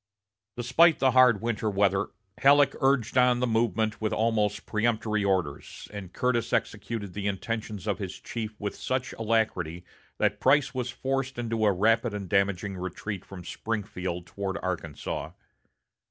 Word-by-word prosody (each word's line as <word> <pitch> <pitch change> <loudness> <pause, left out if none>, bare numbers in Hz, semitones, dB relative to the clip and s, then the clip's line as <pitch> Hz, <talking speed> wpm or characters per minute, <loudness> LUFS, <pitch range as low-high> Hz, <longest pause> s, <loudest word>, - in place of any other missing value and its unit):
Despite 140 +8 +5
the 135 -1 +3
hard 125 -5 +6
winter 110 -2 0
weather, 100 -1 +2 0.3
Halleck 140 0 +6
urged 130 -3 +2
on 125 -1 +4
the 125 - +2
movement 110 -2 0
with 110 - 0
almost 105 -2 +1
peremptory 110 -1 0
orders, 90 -8 -2
and 100 -3 -7
Curtis 125 -2 0
executed 105 -2 -2
the 100 +1 -3
intentions 105 0 -3
of 105 -3 -1
his 95 -3 -5
chief 110 -2 -6
with 100 -1 -3
such 130 0 -2
alacrity 105 -7 -1 0.3
that - - +1
Price 145 0 +3
was 125 -1 -2
forced 135 +1 -2
into 115 -2 0
a - - +5
rapid 115 +3 +2
and 100 -2 -5
damaging 100 0 0
retreat 95 +2 -5
from 95 -2 -10
Springfield 90 -5 -4
toward 100 +1 -4
Arkansas. 90 -6 -4
110 Hz, 145 wpm, -27 LUFS, 100-120 Hz, 0.3 s, hard